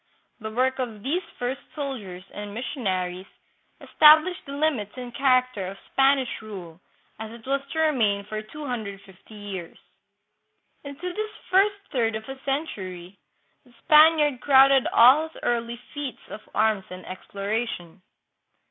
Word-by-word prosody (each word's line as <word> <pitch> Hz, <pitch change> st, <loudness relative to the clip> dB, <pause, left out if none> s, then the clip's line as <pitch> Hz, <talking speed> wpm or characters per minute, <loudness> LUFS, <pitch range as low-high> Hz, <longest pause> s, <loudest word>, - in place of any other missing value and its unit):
The 220 Hz, -1 st, -5 dB
work 260 Hz, +4 st, 0 dB
of 225 Hz, -5 st, -4 dB
these 320 Hz, +7 st, 0 dB, 0.2 s
first 245 Hz, +2 st, -3 dB
soldiers 225 Hz, -, -5 dB
and 205 Hz, 0 st, -7 dB
missionaries 190 Hz, -7 st, -3 dB, 0.5 s
established 310 Hz, +3 st, +5 dB
the -, -, -7 dB
limits 280 Hz, -9 st, -1 dB
and 245 Hz, -1 st, -7 dB
character 255 Hz, -7 st, +2 dB
of 195 Hz, +1 st, -7 dB
Span 270 Hz, +1 st, +4 dB
ish 260 Hz, -4 st, -4 dB
rule 185 Hz, -6 st, -10 dB, 0.4 s
as 220 Hz, 0 st, -6 dB
it 230 Hz, 0 st, -12 dB
was 275 Hz, +1 st, 0 dB
to 320 Hz, -, -3 dB
remain 225 Hz, -10 st, +2 dB
for 215 Hz, +1 st, -5 dB
250 215 Hz, -6 st, -8 dB
years. 195 Hz, -5 st, -7 dB, 1.1 s
Into 300 Hz, +6 st, -6 dB
this 430 Hz, +2 st, -4 dB, 0.2 s
first 395 Hz, +2 st, +4 dB, 0.2 s
third 230 Hz, -5 st, 0 dB
of 220 Hz, -, -5 dB
a 270 Hz, 0 st, -8 dB
century 195 Hz, -, -4 dB, 0.4 s
the 250 Hz, -3 st, -23 dB
Spaniard 305 Hz, -3 st, +5 dB
crowded 270 Hz, -1 st, +6 dB
all 265 Hz, +7 st, +6 dB
his -, -, -16 dB
early 235 Hz, 0 st, -1 dB, 0.2 s
feats 290 Hz, -3 st, -6 dB
of 215 Hz, -, -8 dB
arms 215 Hz, -3 st, +2 dB
and 185 Hz, 0 st, -9 dB
exploration. 200 Hz, -2 st, -5 dB
240 Hz, 140 wpm, -25 LUFS, 205-280 Hz, 1.1 s, crowded